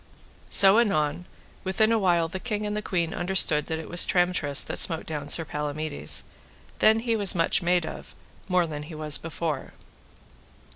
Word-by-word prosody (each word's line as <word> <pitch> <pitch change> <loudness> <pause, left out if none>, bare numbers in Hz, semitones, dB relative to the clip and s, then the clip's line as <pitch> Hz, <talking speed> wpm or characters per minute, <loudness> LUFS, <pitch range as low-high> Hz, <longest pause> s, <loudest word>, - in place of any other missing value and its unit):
So 195 +3 +6
anon, 170 -6 0 0.4
within 200 +4 +1
a 225 - +2
while 175 -4 +1
the 190 +3 -7
king 210 -1 -4
and 210 0 -3
the 210 - -3
queen 170 -5 -2
understood 175 -5 +3
that 160 - -3
it 160 - -8
was 175 - +3
Tramtrist 175 -6 +1
that - - -4
smote 165 -3 +2
down 150 -2 -6
Sir 165 - +3
Palamides; 150 0 -3 0.6
then 220 +2 +3
was 200 -3 +2
he - - -6
much 165 - +1
made 175 -1 +1
of, - - -10 0.3
more 180 -2 +1
than 150 -2 -6
he 155 +2 -10
was 155 -1 +1
before. 160 -3 -5
170 Hz, 175 wpm, -25 LUFS, 155-190 Hz, 0.6 s, So